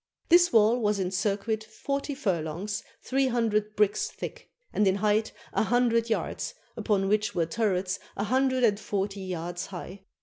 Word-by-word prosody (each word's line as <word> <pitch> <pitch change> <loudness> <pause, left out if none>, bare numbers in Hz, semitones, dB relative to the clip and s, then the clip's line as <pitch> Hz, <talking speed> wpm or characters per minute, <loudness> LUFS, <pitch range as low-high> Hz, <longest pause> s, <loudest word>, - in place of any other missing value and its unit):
This 350 +1 +6
wall 225 +2 +5
was 210 -2 +1
in 185 -2 -1
circuit 205 +3 -1
forty 275 +6 -3
furlongs, 190 - -2 0.2
three 270 0 +1
hundred 215 -3 0
bricks 210 -1 +2
thick, - - -8 0.2
and 210 - +3
in 190 - +3
height 210 +2 +1 0.2
a - - +2
hundred 230 0 +2
yards, 225 - -2 0.2
upon 195 -3 +1
which 210 +1 +1
were 170 - +2
turrets 190 0 0 0.2
a 200 - 0
hundred 260 +3 +2
and 205 -3 +4
forty 200 -1 -2
yards 175 -1 -4
high. 190 +1 -8
210 Hz, 160 wpm, -28 LUFS, 195-230 Hz, 0.2 s, This